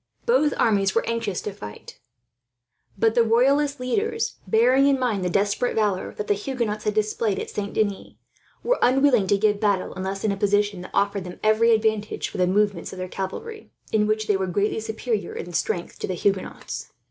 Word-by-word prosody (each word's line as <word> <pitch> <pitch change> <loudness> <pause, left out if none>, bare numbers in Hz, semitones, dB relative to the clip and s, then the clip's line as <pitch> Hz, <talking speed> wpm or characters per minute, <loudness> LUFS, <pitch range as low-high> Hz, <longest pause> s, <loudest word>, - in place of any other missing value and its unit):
Both 305 - +3
armies 200 -3 +2
were 230 - +2
anxious 230 -5 -2
to 210 - -5
fight; 105 - -10 1.0
but 225 +2 +3
the 235 - +4
royalist 275 +5 +3
leaders, 445 - -1
bearing 250 +7 +4
in 275 -1 +3
mind 225 -7 0
the 180 - 0
desperate 205 +6 0
valour 205 -4 0
that 210 - -4
the 205 - +2
Huguenots 215 -1 -3
had 210 -1 0
displayed 215 -1 0
at - - -5
Saint 205 -1 -4
Denis, 205 -3 -1 0.5
were - - +1
unwilling 255 -5 +4
to 200 - +3
give 205 0 +2
battle, 205 -3 0
unless 190 +1 -4
in 215 - +2
a - - -1
position 205 -1 +1
that 180 - -10
afforded 200 -1 0
them 180 - -9
every 215 +2 +4
advantage 220 -1 0
for - - -7
the 180 - +3
movements 200 -1 0
of 190 - -9
their 185 0 -4
cavalry, 420 - -6 0.2
in 210 -1 +2
which 215 0 0
they 210 - +2
were 190 0 -2
greatly 200 +5 0
superior 220 0 -3
in 175 - -6
strength 170 +1 -2
to - - -3
the 185 - -2
Huguenots. 195 +2 -3
210 Hz, 195 wpm, -24 LUFS, 195-235 Hz, 1.0 s, the